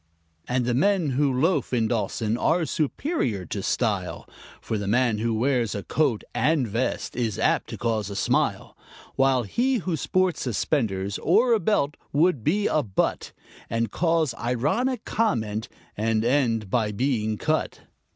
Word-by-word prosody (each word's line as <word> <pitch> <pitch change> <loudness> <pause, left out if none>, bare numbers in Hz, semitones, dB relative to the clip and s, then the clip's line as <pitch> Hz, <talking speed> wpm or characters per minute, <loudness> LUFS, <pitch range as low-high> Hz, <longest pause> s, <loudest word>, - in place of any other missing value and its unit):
And 125 -1 0
the 120 - +1
men 170 +2 +2
who 140 +1 +2
loaf 145 +3 +1
in 115 -3 +2
Dawson 110 0 -1
are 165 +7 +1
superior 145 - -1
to - - -4
style, - - -1 0.3
For 110 - -3
the 100 - -4
man 115 0 +2
who 115 +1 0
wears 120 -2 +1
a 100 - -4
coat 140 -9 0
and 150 -5 +2
vest 115 +5 -2
is 115 -4 -1
apt - - +1
to - - -6
cause 110 -4 -1
a 100 - -6
smile; - - 0 0.4
While 135 -2 +3
he 250 - 0
who 185 -7 -1
sports 185 +2 0
suspenders 105 -6 -1
or 240 0 +3
a 225 - +3
belt 160 -7 0
would 150 -4 +2
be 200 - +1
a 155 - +2
butt, 100 -8 -1 0.4
And 115 -2 -1
cause 165 -6 +1
ironic 150 - 0
comment, 110 - -1 0.3
and 110 +1 0
end 115 -6 +1
by 110 -4 +1
being 110 -2 -1
cut. - - -1
125 Hz, 155 wpm, -25 LUFS, 110-160 Hz, 0.4 s, While